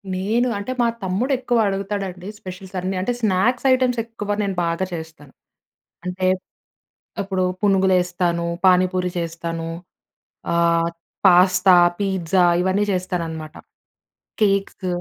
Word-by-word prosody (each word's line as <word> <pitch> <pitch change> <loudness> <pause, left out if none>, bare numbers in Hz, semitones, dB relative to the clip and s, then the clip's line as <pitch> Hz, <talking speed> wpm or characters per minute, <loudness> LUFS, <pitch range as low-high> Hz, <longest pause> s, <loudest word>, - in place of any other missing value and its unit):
నేను 220 +7 +1
అంటే 205 +5 -4
మా - - +3 0.2
తమ్ముడు 195 +9 -1
ఎక్కువ 245 -1 0
అడుగుతాడండి 195 -2 -4
స్పెషల్స్ 190 -1 -9
అన్నీ 185 +1 -3
అంటే 195 - -1
స్నాక్స్ 220 +5 +1
ఐటెమ్స్ 255 -2 +1
ఎక్కువ 210 -3 -4
నేను 195 -2 -2
బాగా 170 +2 -1
చేస్తాను. 160 -4 -9 0.7
అంటే, 180 +1 -2 0.9
అప్పుడు 190 -2 -1 0.2
పునుగులేస్తాను. 180 -3 +2 0.2
పాని 185 0 +5
పూరి 180 -1 -1
చేస్తాను. 165 0 -4 0.8
అహ్, 170 0 +2 0.4
పాస్తా, 185 +1 +6 0.3
పిజ్జా 190 -2 +1 0.2
ఇవన్నీ 190 +2 +1
చేస్తానన్నమాట. 165 -4 -4 0.9
కేక్స్. 195 -2 +1
185 Hz, 110 wpm, -21 LUFS, 175-200 Hz, 0.9 s, పాస్తా